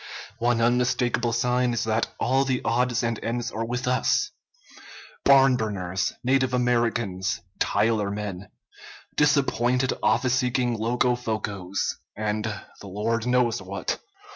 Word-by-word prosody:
One 120 0 +2
unmistakable 120 0 +1
sign 125 +1 +1
is 120 - -1
that 110 +1 0
all 135 +2 +2
the 130 -2 0
odds 120 0 +1
and 115 -2 -2
ends 115 +1 -2
are 115 - -3
with 125 +2 -3
us, 125 0 +1 0.9
Barnburners, 110 -10 +3
native 130 0 +2
Americans, 115 -6 0 0.2
Tyler 105 0 +1
men, 100 -2 -5 0.7
disappointed 130 -3 +2
office 120 +4 +2
seeking 125 -1 +1
Loco 120 +2 +1
focos, 105 -5 -4 0.4
and 105 0 -2 0.3
the 100 - -10
Lord 110 +4 -1
knows 125 -4 +2
what. 95 +1 -3
120 Hz, 115 wpm, -25 LUFS, 110-125 Hz, 0.9 s, Barnburners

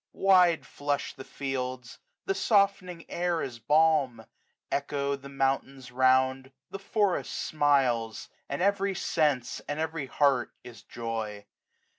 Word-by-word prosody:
Wide 180 -4 +4
flush 145 0 -3
the 135 - -10
fields; 130 -3 -5 0.3
the - - +1
softening 195 -4 +1
air 175 -1 -1
is 120 -3 -6
balm; 150 -1 +3
5 110 - -13 0.5
Echo 140 0 -1
the 140 0 -11
mountains 135 -1 -2
round; 130 +1 +2 0.2
the 195 - -6
forest 200 -1 0
smiles; 130 -7 +1 0.2
And 140 +6 -2
every 200 0 +1
sense, 150 -8 0
and 145 +1 -2
every 160 -3 -3
heart 135 -3 +1
is 120 -4 -12
joy. 110 -3 -5
140 Hz, 125 wpm, -28 LUFS, 130-165 Hz, 0.5 s, Wide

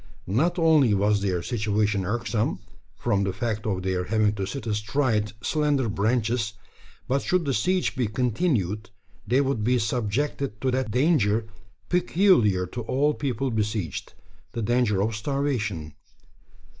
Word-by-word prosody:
Not 155 - +1
only 155 -10 +4
was 100 +1 +2
their 90 -3 -1
situation 105 -3 0
irksome 115 +1 -1 0.4
from 100 -4 +1
the 95 - 0
fact 110 +2 -3
of 95 -3 -1
their 95 -1 -1
having 110 0 +2
to 100 -2 -3
sit 140 +4 -5
astride 110 0 0
slender 145 -5 +1
branches 110 +2 0 0.5
but 135 +2 +1
should 180 -2 +1
the 140 - 0
siege 180 - +1
be 125 -4 0
continued, 110 - 0 0.4
they 130 +3 +3
would 135 -6 -1
be 125 +3 +3
subjected 120 +1 -1
to 130 - +1
that 130 -2 -1
danger 115 -5 +2 0.4
peculiar 175 - +3
to 120 +7 -6
all 135 +6 +1
people 135 -2 -2
besieged 105 - -3 0.4
the 115 - -3
danger 115 -3 +2
of 110 +1 -1
starvation. 110 - -2
115 Hz, 140 wpm, -25 LUFS, 105-135 Hz, 0.5 s, only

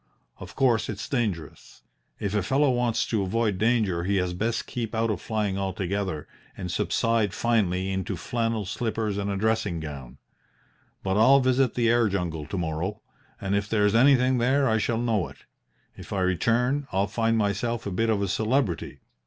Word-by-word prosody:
Of - - -10
course, 120 -4 +2
it's 105 -1 -5
dangerous. 100 - -4 0.4
If 100 -1 -2
a 105 - +2
fellow 135 +8 +2
wants 120 -2 +1
to 110 -3 0
avoid 100 0 0
danger 110 -7 +1
he 100 +2 0
had 90 -2 0
best 115 +1 -1
keep 115 -2 -4
out 115 0 +1
of 100 - -3
flying 105 -3 -1
altogether 95 -3 -2 0.3
and 90 - -4
subside 115 -4 +1
finally 95 -5 +1
into 95 +1 -2
flannel 115 +1 -2
slippers 110 0 -2
and 100 0 -2
a 100 - -1
dressing 110 -4 0
gown. 70 -4 -8 0.9
But 95 +1 0
I'll 130 +6 +6
visit 130 -1 +2
the 120 -2 +2
air 120 -1 +3
jungle 85 -6 -3
to 100 - -4
morrow 85 +5 -3 0.4
and 95 0 -1
if 100 0 -1
there's 105 -2 +2
anything 130 +1 +4
there 135 +3 +3
I 110 0 +2
shall 115 +2 0
know 115 -6 0
it. - - -14 0.6
If - - -11
I 100 -2 -1
return, 120 +10 +1
I'll 95 +1 +1
find 115 +2 0
myself 110 +3 -1
a 100 - -3
bit 115 +5 0
of 105 -3 +1
a - - 0
celebrity. 110 0 -1
105 Hz, 180 wpm, -26 LUFS, 95-115 Hz, 0.9 s, I'll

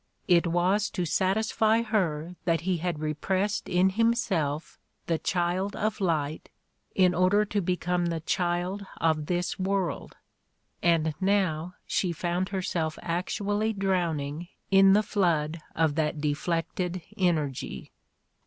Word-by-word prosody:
It 175 -1 +4
was 180 +5 +2
to 180 - +1
satisfy 220 +5 +2
her 180 -7 -1
that 165 -3 +2
he 180 +1 0
had 170 -1 -2
repressed 185 +7 -1
in 185 +2 +3
himself 195 - 0 0.3
the 165 -2 0
child 180 +3 -1
of 215 0 -2
light 155 -4 -1 0.5
in 185 -2 +4
order 185 +4 +3
to 205 0 -1
become 180 -1 0
the 165 -1 -1
child 175 +4 -1
of 155 -2 +1
this 180 +1 -1
world, 190 -4 -2 0.6
and 165 -2 +2
now 180 -3 +1
she 180 - 0
found 175 +2 -1
herself 175 -5 -2
actually 205 +5 -1
drowning 170 -5 -1 0.2
in 195 0 +7
the 210 +2 +4
flood 165 -6 0 0.2
of 160 -2 +2
that 150 0 -1
deflected 165 +4 -2
energy 155 -8 -1
180 Hz, 125 wpm, -27 LUFS, 165-195 Hz, 0.6 s, in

